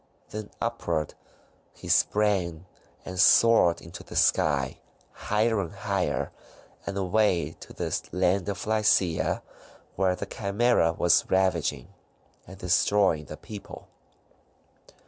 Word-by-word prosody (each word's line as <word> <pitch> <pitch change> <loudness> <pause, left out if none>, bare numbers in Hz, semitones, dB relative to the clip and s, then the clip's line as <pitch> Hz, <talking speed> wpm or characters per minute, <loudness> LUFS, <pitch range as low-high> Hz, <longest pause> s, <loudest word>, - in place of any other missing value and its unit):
Then 105 -1 -6
upward 85 -10 -2 0.6
he - - -11
sprang, 95 -5 +1 0.4
and 90 0 -6
soared 105 -3 +5
into 85 +1 -10
the - - -11
sky, 70 -3 +2 0.3
higher 110 0 0
and 85 - -6
higher, 100 -2 -2 0.6
and 100 - -3
away 95 -5 +1
to - - -12
the - - -3 0.2
land 90 +1 +1
of 100 -2 -4
Lycia, 105 -6 +1 0.5
where 95 -1 +1
the 100 - -5
Chimaera 100 -3 +1
was 85 +1 +2
ravaging, 85 -8 0 0.5
and 95 +2 -11
destroying 90 -3 +2
the 75 - -9
people. 105 +5 -10
95 Hz, 110 wpm, -26 LUFS, 85-105 Hz, 0.6 s, soared